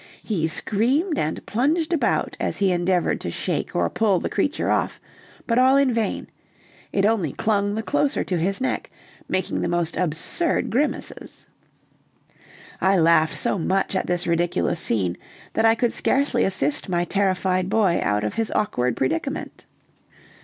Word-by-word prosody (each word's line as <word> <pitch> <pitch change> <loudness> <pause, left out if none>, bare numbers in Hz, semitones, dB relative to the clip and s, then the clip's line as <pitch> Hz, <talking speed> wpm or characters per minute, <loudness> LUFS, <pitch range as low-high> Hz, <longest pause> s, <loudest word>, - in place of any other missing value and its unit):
He 170 -8 -1
screamed 260 - 0
and 155 - -2
plunged 310 - 0
about 325 - 0
as - - -2
he 195 -2 +2
endeavored 175 0 +1
to - - -3
shake - - -3
or - - +2
pull 205 -5 +1
the - - -4
creature 280 +9 0
off, - - 0 0.5
but 235 +1 +2
all 260 +2 +5
in 275 -3 +3
vain; 225 -3 -1 0.7
it 195 - +1
only 205 -10 +1
clung 205 -2 0
the 220 - -2
closer 290 +3 0
to 180 -3 -2
his 195 +4 0
neck, 260 - -2 0.4
making 185 -1 -1
the - - 0
most 175 -1 -1
absurd 180 - -1
grimaces. 285 +6 -3 1.4
I 190 +1 +4
laughed 165 -2 +3
so 200 - 0
much 190 +3 0
at 190 - -1
this 175 0 -1
ridiculous 170 0 0
scene, 95 - 0 0.4
that 220 - +2
I 225 0 +5
could 235 0 0
scarcely 280 +2 +1
assist 150 -4 -1
my 175 -1 +1
terrified 185 -1 0
boy 205 -5 +2
out 105 0 0
of 105 - -2
his 225 -1 -1
awkward 125 - 0
predicament. 165 - -3
195 Hz, 155 wpm, -23 LUFS, 170-230 Hz, 1.4 s, all